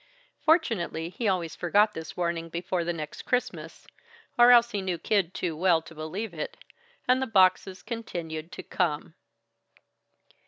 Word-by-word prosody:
Fortunately 225 - +1
he 220 +5 -3
always 180 -4 0
forgot 205 +5 +3
this 160 -4 -8
warning 170 -1 -2
before 170 +1 -2
the 170 - -1
next 155 -3 -6
Christmas 250 0 -3 0.5
or 240 0 +7
else 240 -1 +7
he 205 - -2
knew 185 -2 -2
Kid 195 -2 +1
too 170 -3 -2
well 170 0 +3
to 165 - -12
believe 165 +8 -5
it - - -5 0.5
and 255 +1 +4
the 265 - -1
boxes 190 -2 +3
continued 170 -9 -5
to - - -7
come. 160 -2 -1
185 Hz, 150 wpm, -27 LUFS, 165-225 Hz, 0.5 s, or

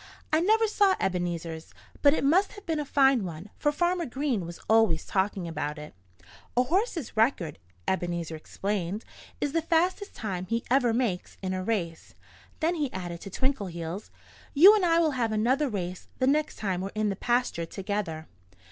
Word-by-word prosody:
"I 315 - +4
never 440 +5 +4
saw 405 -3 +3
Ebenezer's. 170 -3 -3 0.3
But 285 +1 +6
it - - -1
must 355 +8 +3
have 410 -1 -12
been 320 -2 -1
a 295 - -2
fine 270 -4 +4
one, 175 +2 -7
for 295 - +2
Farmer 345 +1 0
Green 250 - -1
was 170 - -8
always 220 -8 +3
talking 190 -2 -1
about 150 -2 -3
it." 150 0 -9 0.6
"A 250 - +6
horse's 345 - -1
record," 215 - +1 0.3
Ebenezer 175 -3 -1
explained, 195 +4 -3 0.3
"is 290 - -1
the 330 +2 +1
fastest 350 +5 0
time 185 -4 -4
he 230 +3 -1
ever 250 -3 +4
makes 225 -6 -1
in 185 0 -1
a 185 0 -2
race." 180 -6 -3 0.5
Then 325 +2 +2
he 295 -6 -1
added, 175 -2 -5
to - - -7
Twinkleheels: 190 -7 -3 0.5
"You 370 +9 +10
and 420 -3 +2
I 335 -1 +4
will 325 -2 +3
have 240 -5 0
another 255 +7 +2
race 180 -4 -4
the 255 - +1
next 300 +3 +2
time 190 -4 -2
we're 195 - -3
in 215 -1 +1
the 195 - -1
pasture 240 -7 0
together." 190 -5 -3
220 Hz, 175 wpm, -28 LUFS, 180-295 Hz, 0.6 s, You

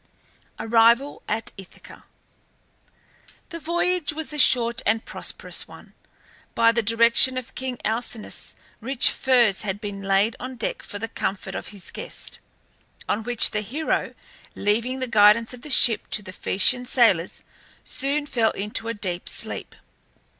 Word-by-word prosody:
ARRIVAL 235 +5 +3
AT 225 +2 -2
ITHACA. 190 - -14 1.5
The 335 -2 -7
voyage 345 0 0
was 310 0 -6
a 300 - -4
short 235 -3 +5
and 220 +1 0
prosperous - - -2
one. - - -14 0.6
By 230 0 +5
the 235 0 0
direction 230 +3 +3
of 255 -2 -6
king 260 -1 -4
Alcinous 225 0 -3 0.2
rich 255 +2 +1
furs 240 -7 +2
had 205 -1 -3
been 205 -2 -6
laid 195 +3 +2
on 255 +1 -6
deck 235 - -3
for 205 - -8
the 225 +2 -4
comfort 190 -3 -4
of - - -6
his 200 -4 -8
guest, - - -7 0.7
on 210 - 0
which 240 +1 +5
the 210 - -2
hero, 285 +10 -2 0.4
leaving 235 +6 0
the 255 - -1
guidance 220 +1 +4
of 245 - -11
the 300 - -10
ship 240 -4 +3
to 210 - -2
the 185 -1 -10
Phaeacian 250 +8 +1
sailors, 215 -10 +2 0.4
soon 280 +3 -2
fell 235 -6 +1
into 210 +3 -4
a 230 - -3
deep 180 -4 -4
sleep. - - -4
230 Hz, 145 wpm, -23 LUFS, 210-255 Hz, 1.5 s, short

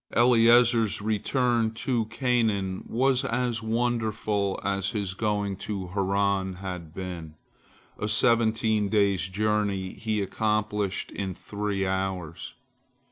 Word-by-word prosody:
Eliezer's 115 -2 +5
return 115 +2 +1
to 120 -1 0
Canaan 110 -5 0
was 130 +2 +2
as 125 -3 -1
wonderful 110 -3 -1
as 100 0 0
his 100 -3 -3
going 105 -1 -1
to 95 -2 -5
Haran 100 0 0
had 90 -4 -6
been. 85 -3 -7 0.6
A 105 - -2
seventeen 110 -1 +3
days' 100 -3 +2
journey 100 -2 0
he 110 -2 -2
accomplished 105 0 -1
in 95 -2 -4
three 100 -1 -3
hours. 95 -3 -3
105 Hz, 105 wpm, -27 LUFS, 95-115 Hz, 0.6 s, Eliezer's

